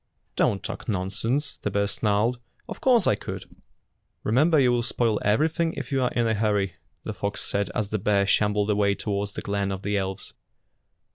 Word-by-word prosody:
"Don't 100 -1 +1
talk - - -6
nonsense," 110 +9 -1
the - - -1
bear 100 0 +1
snarled. 105 +4 +1 0.3
"Of - - -8
course 240 -7 +4
I - - +4
could." - - -6 0.8
"Remember 150 +9 +3
you 125 -2 +4
will 120 -1 +2
spoil 115 -2 0
everything 160 - +2
if - - -6
you 135 -1 +1
are 125 - +2
in 120 -1 +1
a 110 - +2
hurry," 105 -3 +1 0.3
the - - -4
fox 100 0 -3
said 100 0 -1
as 105 -2 -1
the 110 - -1
bear 100 0 +2
shambled 105 +1 +2
away 100 -1 +2
toward 100 -1 -2
the - - -7
glen 100 -1 -1
of 95 0 -5
the 100 +1 0
elves. 95 -1 -4
105 Hz, 190 wpm, -25 LUFS, 100-120 Hz, 0.8 s, course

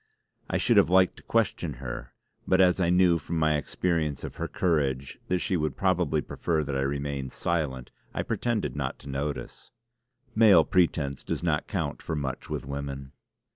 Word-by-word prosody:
I - - +1
should - - +3
have - - +6
liked 95 0 +4
to - - -12
question 100 -8 0
her, 65 -1 -7 0.3
but 95 - +3
as 95 0 +4
I 85 - +2
knew 90 -1 +4
from 80 +3 -4
my 80 -1 +3
experience 75 -1 -1
of - - -7
her - - -2
courage 70 -6 0
that 90 - +1
she 90 - -1
would 75 -5 -1
probably 90 -3 +1
prefer 80 -3 -1
that 70 -1 -3
I 65 - +1
remained 70 -1 -2
silent, 75 -7 -2 0.2
I - - -2
pretended 120 -9 -1
not 70 -3 -3
to 70 - -10
notice. 70 -2 -4 0.6
Male 105 -7 +7
pretence 75 -6 +1
does - - -3
not 80 -4 0
count - - -3
for 80 - -3
much 70 -3 -4
with - - -3
women. 70 -1 -5
75 Hz, 175 wpm, -27 LUFS, 70-90 Hz, 0.6 s, Male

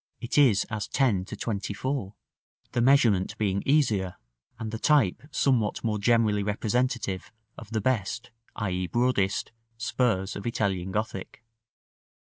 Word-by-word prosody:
it 120 - -4
is 125 -9 +5
as 110 -1 -3
10 110 -9 +1
to 110 - -7
24, 105 +2 -3 0.6
the 120 - 0
measurement 120 -7 +3
being 100 -2 0
easier 110 -11 +2 0.4
and 110 -1 -5
the 115 - -4
type 145 - +3
somewhat 125 -8 +1
more 105 -2 0
generally 110 -1 +3
representative 105 -1 -1 0.2
of 115 - -11
the 110 -1 -1
best, 115 -1 -1 0.2
i.e. 90 -4 -2
broadest, 120 -4 +1 0.3
spurs 110 -4 0
of 100 - -5
Italian 95 -5 -1
Gothic. 105 +1 -4
110 Hz, 125 wpm, -27 LUFS, 100-120 Hz, 0.6 s, is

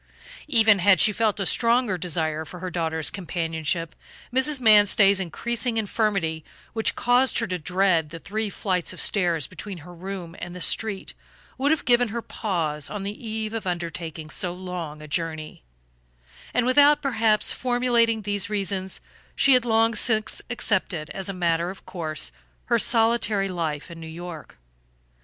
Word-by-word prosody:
Even 220 -7 +5
had 190 -1 +5
she 215 - +5
felt 215 -1 0
a 195 - -1
stronger 235 -1 +2
desire 160 -3 -1
for 170 +3 -10
her 185 +1 -5
daughter's 160 -2 -1
companionship, 165 -3 -2 0.4
Mrs. 270 +2 +4
Manstey's 205 -3 +5
increasing 235 +6 -2
infirmity, 200 -7 -1 0.3
which 225 -1 +1
caused 250 +2 +3
her 230 - +1
to 185 -4 -3
dread 180 -1 +1
the 165 - -8
three 215 +5 -3
flights 185 -3 -2
of - - -10
stairs 175 -7 +1
between 185 +4 -8
her 180 - -11
room 180 -1 -7
and 175 0 -7
the - - -7
street, 205 +2 0 0.5
would 275 +2 +2
have 315 0 +1
given 245 0 +4
her 230 +2 -5
pause 160 -8 -2
on 210 -2 -5
the 210 +4 -6
eve 220 0 -3
of 225 -4 -4
undertaking 165 -3 -5
so 180 - 0
long 175 -5 -6
a - - -9
journey; 155 - -3 0.9
and 245 - +1
without 290 +4 +5
perhaps, 225 -5 +2
formulating 240 -3 +1
these 205 0 -1
reasons 195 -2 -2 0.3
she 275 - +5
had 250 -1 +3
long 225 0 +3
since 220 -1 +1
accepted 190 -9 -1
as 195 0 -3
a - - 0
matter 170 -2 0
of 190 - -10
course 155 -4 -3 0.3
her 235 -1 +2
solitary 225 -4 +2
life 165 -3 -3
in 165 - -10
New 165 - -8
York. 165 - -9
195 Hz, 160 wpm, -24 LUFS, 170-225 Hz, 0.9 s, Even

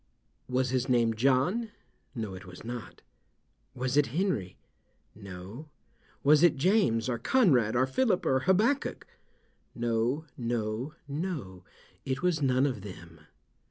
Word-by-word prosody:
"Was 130 0 0
his 130 0 0
name 120 -2 +3
John?" 135 - +1 0.5
"No, 110 -5 -4
it 95 0 -10
was 90 -1 -11
not." 120 0 -7 0.7
"Was 130 +2 -1
it 145 - +4
Henry?" 135 - -1 0.6
"No." 100 - -10 0.5
"Was 150 +1 +6
it 175 -2 +5
James 140 - +2
or 120 -2 -1
Conrad 125 - +3
or 130 +2 +4
Phillip 190 - +1
or 130 - +3
Habbakuk?" 225 +10 +2 0.7
"No, 120 +5 0
no, 120 +3 -3
no; 140 - -5 0.4
it 135 +4 -3
was 175 -4 +1
none 130 -1 +3
of 125 -8 -2
them." 85 -5 -11
130 Hz, 125 wpm, -29 LUFS, 110-155 Hz, 0.7 s, Was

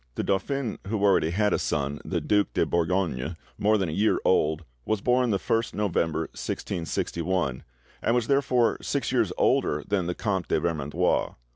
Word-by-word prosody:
The - - -1
dauphin, 115 +5 -1
who 105 -1 -1
already 95 -5 +4
had 105 +4 +1
a - - +1
son, 70 0 -1
the - - -2
Duc 105 -1 +2
de - - +3
Bourgogne, 85 -4 -1 0.2
more 110 +1 +3
than 95 -3 0
a - - -3
year 105 +7 +2
old, 80 -2 +2 0.2
was 110 - 0
born 125 +3 +2
the 100 - +2
1st 115 +4 -1
November 85 -6 0
1661, 80 -2 -2 0.4
and 115 - +2
was 120 -2 +1
therefore 125 -3 +2
six - - -1
years - - +2
older 75 - +2
than 95 -4 0
the 90 - -2
Comte 95 -5 -1
de - - +1
Vermandois. 85 +1 0
95 Hz, 170 wpm, -26 LUFS, 80-110 Hz, 0.4 s, already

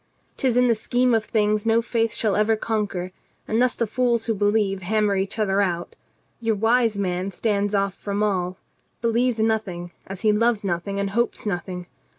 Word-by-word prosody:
'Tis 250 -3 +1
in 250 0 +5
the 235 - +4
scheme 245 +3 +1
of 225 -1 +2
things 210 -1 +1
no 225 0 +3
faith 230 -1 0
shall 215 -2 0
ever 215 +1 +3
conquer, 205 -5 -2 0.4
and 220 +2 +1
thus 250 0 +3
the 230 - 0
fools 235 0 +1
who 225 - +1
believe 205 -1 +1
hammer 210 +2 +1
each 195 +3 -2
other 200 -2 +2
out. 175 -3 -2 0.4
Your 225 -2 0
wise 225 +1 +2
man 185 -1 -1
stands 205 +1 0
off 200 -1 +1
from 200 +1 -3
all, 185 -3 -1 0.5
believes 235 +1 +2
nothing, 210 -6 -1 0.2
as 190 -1 -6
he 215 - +4
loves 225 0 +2
nothing 195 +2 -2
and 200 0 -1
hopes 235 +2 -1
nothing. 180 -2 -3
210 Hz, 180 wpm, -23 LUFS, 195-230 Hz, 0.5 s, in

